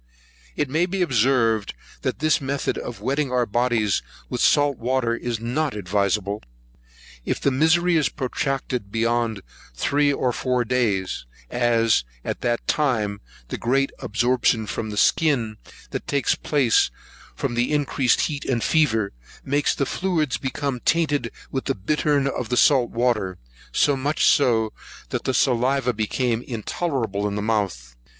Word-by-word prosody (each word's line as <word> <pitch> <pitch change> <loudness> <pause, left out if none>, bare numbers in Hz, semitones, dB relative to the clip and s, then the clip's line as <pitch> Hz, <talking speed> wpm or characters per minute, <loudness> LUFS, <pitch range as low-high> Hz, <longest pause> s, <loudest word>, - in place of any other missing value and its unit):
It 145 - 0
may 160 +6 +1
be 190 0 0
observed, 115 - +2 0.3
that - - -2
this 155 +1 +2
method 135 +1 -1
of 115 -5 -6
wetting 135 +3 -1
our 125 -1 +2
bodies 115 - +1 0.3
with - - -2
salt 145 -2 +3
water 120 -1 0
is 120 -2 -3
not 125 +4 -1
advisable, 100 +1 -1 0.8
if - - -2
the 140 - +1
misery 165 +5 +3
is 150 - +2
protracted 130 -5 -3
beyond 115 -2 0 0.3
three 145 - +2
or 130 -2 0
four 125 -1 0
days, 100 - 0 0.2
as, 115 - +2 0.2
after - - -3
that 120 0 -1
time, 110 -9 0 0.3
the - - -4
great 135 +3 +1
absorption 120 0 +1
from 110 +1 -4
the 105 - -6
skin 120 -6 +2 0.3
that - - -5
takes 140 -4 +1
place 135 -6 +2 0.5
from 120 - -2
the 120 +3 0
increased 140 -4 +2
heat 145 -3 -2
and 120 -3 0
fever, 115 -11 +2 0.3
makes 145 +2 +1
the 140 - 0
fluids 160 -5 0
become 135 -1 -2
tainted 145 -4 +1 0.2
with 130 - -3
the - - 0
bittern 145 +7 +1
of 125 -4 -2
the 125 - 0
salt 130 -4 +5
water; 115 -6 0 0.3
so 145 - +3
much 145 +3 0
so, 115 -5 +3 0.4
that - - -3
the 130 - +1
saliva 130 0 +2
became 115 +2 -1
intolerable 115 - -2
in 100 - -3
the 105 - -2
mouth. 95 - -2
125 Hz, 145 wpm, -23 LUFS, 110-140 Hz, 0.8 s, salt